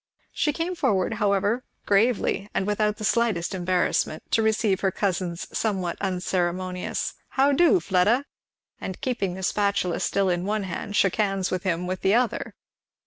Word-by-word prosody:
She 300 - +1
came 330 +4 -2
forward 225 - +1
however 205 +4 +1 0.2
gravely 205 -1 +2
and 190 - +1
without 210 +1 0
the - - -7
slightest 210 -5 +1
embarrassment 180 -3 0
to 225 - +3
receive 220 -3 +2
her 195 - +2
cousin's 180 -3 -2
somewhat 190 -6 -1
unceremonious 180 -1 -2 0.2
"How 275 +2 +3
do, 345 +6 +5
Fleda?" 210 - +2 0.5
and 190 - -6
keeping 200 -8 -1
the 190 - -7
spatula 200 -3 0
still 195 0 +1
in 175 0 -1
one 210 +1 -1
hand 200 +2 -5
shook 195 -3 +3
hands 195 -3 0
with 185 - -1
him 180 -2 -1
with 185 +1 -3
the 195 +2 +3
other. 245 -1 0
195 Hz, 155 wpm, -25 LUFS, 185-220 Hz, 0.5 s, do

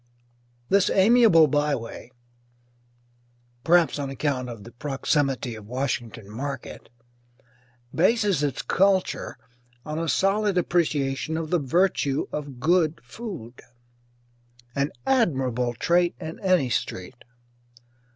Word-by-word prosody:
This 200 -1 +4
amiable 205 -5 +6
byway 145 -6 -2 1.5
(perhaps 170 -2 +3
on 140 -1 -3
account 135 -2 -2
of 115 -4 -9
the 115 - -12
proximity 135 -1 -1
of 110 -2 -10
Washington 120 -4 -3
Market) 135 +7 -6 1.0
bases 200 -2 +2
its 145 -4 -2
culture 190 0 +1 0.5
on 155 +1 -4
a 165 -1 -2
solid 200 0 +1
appreciation 155 -4 0
of 160 -1 -4
the 175 - +3
virtue 145 -1 +1
of 145 -4 -6
good 160 +2 +2
food, 130 - -9 1.1
an 140 +2 -1
admirable 130 - +1
trait 175 +6 +2
in 160 +1 -7
any 180 -10 +2
street. 100 +3 -4
150 Hz, 100 wpm, -25 LUFS, 130-180 Hz, 1.5 s, amiable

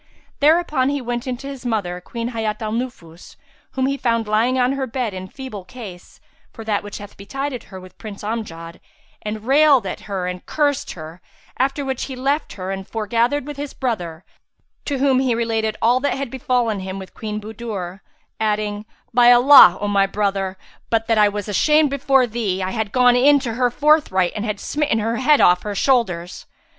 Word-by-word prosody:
Thereupon 300 -3 +3
he 285 0 -1
went 240 0 -4
in 250 -1 -2
to 275 - -9
his 275 -2 -8
mother, 200 -7 -2
Queen 235 +5 -5
Hayat 220 -3 -3
al 215 -1 -3
Nufus, 215 -9 -6 0.4
whom 260 -1 0
he 275 +1 0
found 230 -4 0
lying 225 +5 +2
on 250 0 +2
her 270 -1 -2
bed 240 -3 -3
in 185 0 -6
feeble 255 -3 -8
case, 185 -3 -11 0.3
for 225 - -10
that 210 -2 0
which 205 0 -8
had 205 0 -11
betided 265 +5 -5
her 190 - -10
with 185 0 -15
Prince 210 -2 -9
Amjad, 170 -7 -5 0.4
and 215 0 -5
railed 275 -3 +5
at 185 - -4
her 190 -2 -2
and 180 0 -5
cursed 290 -2 0
her; 160 +1 -10 0.4
after 275 +2 0
which 265 -2 -2
he 265 - -7
left 275 +4 -1
her 185 0 -5
and 195 0 -5
fore 220 -1 -4
gathered 240 +6 +1
with 295 -1 -7
his 285 0 -6
brother, 180 -10 -3 0.6
to 285 - -1
whom 265 -1 +3
he 255 -3 +1
related 225 -2 -1
all 240 +3 +4
that 285 +1 -1
had 270 -3 -4
befallen 245 -5 0
him 190 0 -5
with 190 -1 -9
Queen 210 -1 -5
Budur, 210 -4 -6 0.4
adding, 210 -1 -1 0.3
"By 245 0 +7
Allah, 245 -6 +8
O 205 - -2
my 200 -1 +3
brother, 195 -2 -1 0.3
but 225 -1 +1
that 225 -1 +2
I 210 -1 +5
was 205 0 -5
ashamed 300 +8 +3
before 270 -1 +3
thee, 215 -5 -2
I 185 - -2
had 220 -2 -2
gone 250 0 +4
in 285 +4 +5
to 240 -4 -3
her 250 +1 +1
forthright 265 - +2
and 210 +1 -3
had 210 -2 -3
smitten 295 -6 -1
her 225 +2 -1
head 285 +4 +4
off 180 0 +5
her 210 -1 -5
shoulders!" 190 -10 0
225 Hz, 195 wpm, -21 LUFS, 200-260 Hz, 0.6 s, Allah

